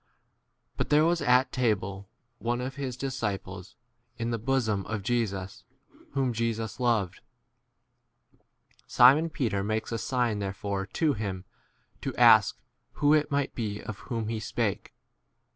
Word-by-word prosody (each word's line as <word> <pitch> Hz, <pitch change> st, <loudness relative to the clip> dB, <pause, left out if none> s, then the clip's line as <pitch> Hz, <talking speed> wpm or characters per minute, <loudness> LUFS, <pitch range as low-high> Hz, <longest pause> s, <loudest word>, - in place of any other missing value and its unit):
But -, -, -1 dB
there 150 Hz, +1 st, +5 dB
was 170 Hz, 0 st, +2 dB
at 125 Hz, +2 st, +3 dB
table 100 Hz, -5 st, -1 dB, 0.3 s
one 120 Hz, +1 st, -1 dB
of 130 Hz, +2 st, -4 dB
his 130 Hz, -3 st, -5 dB
dis 135 Hz, 0 st, -3 dB
ciples, 95 Hz, -3 st, -4 dB, 0.4 s
in 115 Hz, 0 st, -2 dB
the 115 Hz, -, -1 dB
bosom 110 Hz, -4 st, 0 dB
of 105 Hz, -2 st, -3 dB
Jesus, 100 Hz, -5 st, -2 dB, 0.3 s
24 -, -, -26 dB
whom 130 Hz, -3 st, +1 dB
Jesus 115 Hz, -1 st, -2 dB
loved. 115 Hz, -7 st, 0 dB, 1.7 s
Simon 140 Hz, +7 st, +6 dB
Peter 115 Hz, -, -1 dB
makes 110 Hz, +3 st, -2 dB
a 115 Hz, -, -2 dB
sign 120 Hz, -2 st, 0 dB
therefore 100 Hz, 0 st, -3 dB
to 150 Hz, +6 st, +1 dB
him 100 Hz, -4 st, -4 dB, 0.6 s
to -, -, -4 dB
ask -, -, +6 dB, 0.4 s
who 145 Hz, 0 st, +3 dB
it 150 Hz, -1 st, +3 dB
might 140 Hz, -2 st, -1 dB
be 105 Hz, -3 st, -3 dB
of 110 Hz, -, -7 dB
whom 115 Hz, -3 st, -4 dB
he 115 Hz, -1 st, -2 dB
25 -, -, -7 dB
spake. -, -, -2 dB
115 Hz, 145 wpm, -28 LUFS, 100-130 Hz, 1.7 s, Simon